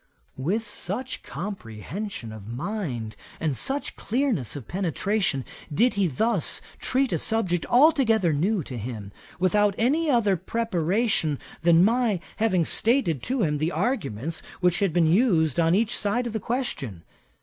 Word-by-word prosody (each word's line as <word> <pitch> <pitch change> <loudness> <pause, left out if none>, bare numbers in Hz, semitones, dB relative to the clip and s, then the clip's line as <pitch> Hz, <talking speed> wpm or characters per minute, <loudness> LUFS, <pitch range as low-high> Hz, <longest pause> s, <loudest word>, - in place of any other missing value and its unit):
With 190 - -1
such 210 +5 -4
comprehension 170 - -6
of 110 -2 -10
mind, 125 - -4 0.2
and 155 -4 0
such 275 - -2
clearness 235 - -1
of 135 -6 -8
penetration, 185 -4 0 0.3
did 235 - +3
he 200 -2 +2
thus 190 - +1 0.2
treat 265 0 0
a - - +1
subject 185 -7 0
altogether 240 - +4
new 180 +5 +1
to 125 -3 -6
him, 105 -3 -6 0.3
without 200 +2 +3
any 300 +8 +2
other 225 -7 +3
preparation 185 - 0 0.2
than 170 +2 +5
my 230 -3 +2 0.2
having 190 -6 +2
stated 220 - +1
to 255 - -1
him 150 -3 0
the 160 +3 0
arguments 160 - -2 0.2
which 180 -2 +2
had 195 -3 +2
been 170 0 +3
used 165 - +3
on 165 +1 +4
each 225 +3 +1
side 215 +4 0
of 235 - -4
the 220 - -1
question. 155 - -3
190 Hz, 145 wpm, -25 LUFS, 155-225 Hz, 0.3 s, than